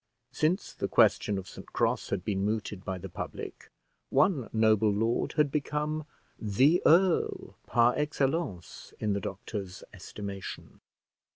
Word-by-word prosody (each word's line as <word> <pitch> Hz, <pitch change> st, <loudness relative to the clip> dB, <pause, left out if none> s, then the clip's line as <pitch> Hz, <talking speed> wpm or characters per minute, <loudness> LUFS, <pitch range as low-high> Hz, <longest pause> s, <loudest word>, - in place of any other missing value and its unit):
Since 160 Hz, +8 st, 0 dB
the -, -, -3 dB
question 105 Hz, -, +3 dB
of 95 Hz, -, -6 dB
St -, -, -11 dB
Cross -, -, 0 dB
had 95 Hz, -2 st, -2 dB
been 100 Hz, -2 st, -1 dB
mooted 105 Hz, -2 st, -2 dB
by 95 Hz, 0 st, -3 dB
the 95 Hz, +2 st, -7 dB
public, 85 Hz, -, -7 dB, 0.4 s
one 140 Hz, -, +2 dB
noble 110 Hz, -1 st, +4 dB
lord 115 Hz, +4 st, 0 dB
had 150 Hz, -2 st, +2 dB
become 150 Hz, +1 st, -2 dB, 0.3 s
"the 130 Hz, -, +3 dB
earl," 175 Hz, +2 st, +3 dB
par 120 Hz, +1 st, +4 dB
excellence, 145 Hz, -, -2 dB
in 105 Hz, -1 st, 0 dB
the 100 Hz, -, -1 dB
doctor's 95 Hz, -1 st, -6 dB
estimation. 100 Hz, -2 st, -8 dB
110 Hz, 130 wpm, -29 LUFS, 100-150 Hz, 0.4 s, noble